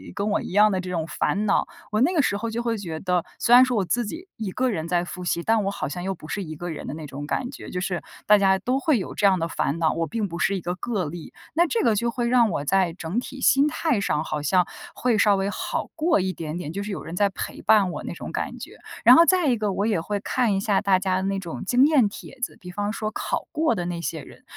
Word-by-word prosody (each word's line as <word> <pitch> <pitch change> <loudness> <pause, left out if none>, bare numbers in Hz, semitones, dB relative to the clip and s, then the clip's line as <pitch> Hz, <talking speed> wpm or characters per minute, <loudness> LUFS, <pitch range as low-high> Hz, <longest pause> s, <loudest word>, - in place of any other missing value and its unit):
跟 200 +1 -1
我 205 - +1
一 - - -7
样 210 +2 +5
的 190 - 0
这 185 - -7
种 170 -3 -2
烦 205 +4 -1
恼。 200 - +2 0.2
我 215 +1 +1
那 330 +9 +3
个 320 - +4
时 200 - 0
候 230 +2 -3
就 235 +2 -2
会 230 -1 -1
觉 165 -6 -5
得， 180 -2 0 0.2
虽 240 - +3
然 250 - +9
说 255 -1 +1
我 195 - +1
自 240 +6 0
己 330 - -7
一 215 -4 -4
个 255 +6 0
人 165 -7 -3
在 175 0 +1
复 180 +1 -7
习， 170 -1 0
但 225 +1 +2
我 195 - -1
好 155 - -4
像 175 +5 -5
又 195 +1 -1
不 160 -4 -12
是 200 +5 -3
一 155 -2 -7
个 175 +3 -6
人 160 - -6
的 - - -4
那 155 0 -7
种 140 +2 -7
感 245 - -2
觉。 275 - -10
就 180 - -3
是 180 -1 -2 0.2
大 210 0 +7
家 190 -1 +3
都 255 +6 0
会 275 -5 +2
有 - - -6
这 - - +1
样 190 -2 +4
的 165 - -1
烦 155 -1 -2
恼， 160 -2 +2
我 165 0 -1
并 220 -2 -2
不 170 -1 -6
是 195 - +2
一 180 - -5
个 175 +1 -3
个 195 -1 -2
例。 160 +2 -8 0.2
那 340 +4 +4
这 250 -6 0
个 225 -3 +3
就 235 +3 0
会 240 0 -1
让 235 -2 +4
我 145 -4 -3
在 185 +1 +2
整 175 +5 -3
体 270 +2 -8
心 275 +3 +5
态 300 -7 0
上 155 -6 0
好 155 -1 -3
像 180 +4 +2 0.3
会 245 -3 +1
稍 205 -1 +4
微 195 +1 -1
好 - - -3
过 325 -2 +2
一 185 0 -1
点 160 0 -5
点， 165 -4 -5
就 200 +1 -3
是 210 - -5
有 195 - -5
人 165 - -7
在 200 +2 +3
陪 190 - -6
伴 200 -4 +4
我 - - -6
那 - - -5
种 - - -7
感 - - -3
觉。 - - -10 0.3
然 - - +9
后 335 - +7
再 360 -3 +3
一 245 - +3
个， 210 -2 -1
我 200 - 0
也 205 -7 +1
会 205 +4 -3
看 235 +1 0
一 195 - +1
下 200 -1 +1
大 195 -2 +3
家 190 -1 0
的 190 - -1
那 195 0 -1
种 175 -4 -6
经 250 +6 +4
验 280 -8 +4
帖 260 +5 -11
子。 245 - -3
比 180 - -10
方 205 +2 -2
说 215 -1 -3
考 - - -3
过 310 -5 +1
的 175 -3 -3
那 175 -1 -4
些 160 -3 -4
人， - - -15
200 Hz, 315 characters per minute, -24 LUFS, 175-235 Hz, 0.3 s, 然